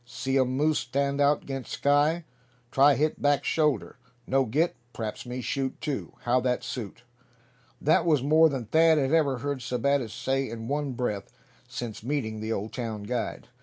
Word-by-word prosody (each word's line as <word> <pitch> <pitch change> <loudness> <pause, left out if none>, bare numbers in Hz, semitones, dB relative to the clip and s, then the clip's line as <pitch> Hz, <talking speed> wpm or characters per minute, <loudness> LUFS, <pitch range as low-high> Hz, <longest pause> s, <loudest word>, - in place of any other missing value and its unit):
See 135 +2 -1
um 130 0 +1
moose 155 +1 +2
stand 140 +3 -1
out 145 +1 +3
'gainst 135 -2 -5
sky. 145 +4 +2 0.5
Try 140 +3 +5
hit 150 +3 0
back 145 -1 +3
shoulder. 150 -10 0 0.3
No 135 +2 +2
get, 150 +9 +1 0.2
p'raps 110 +2 -5
me 125 +1 -4
shoot 135 +1 -2
too. 145 - -4
How 120 +1 +2
that 125 -1 0
suit?" 120 -1 -6 0.8
That 155 +3 +3
was 150 -6 +2
more 160 +3 +5
than 135 -5 -3
Thad 160 +6 +4
had 135 -2 +1
ever 145 -5 +3
heard 140 +2 -3
Sebattis 125 0 0
say 135 +2 -1
in 115 0 -6
one 145 0 -1
breath 105 -5 -3 0.4
since 115 -3 -6
meeting 115 -4 -2
the 110 +1 -4
Old 105 0 -3
town 110 -4 -4
guide. 120 +3 -4
135 Hz, 170 wpm, -27 LUFS, 120-145 Hz, 0.8 s, Try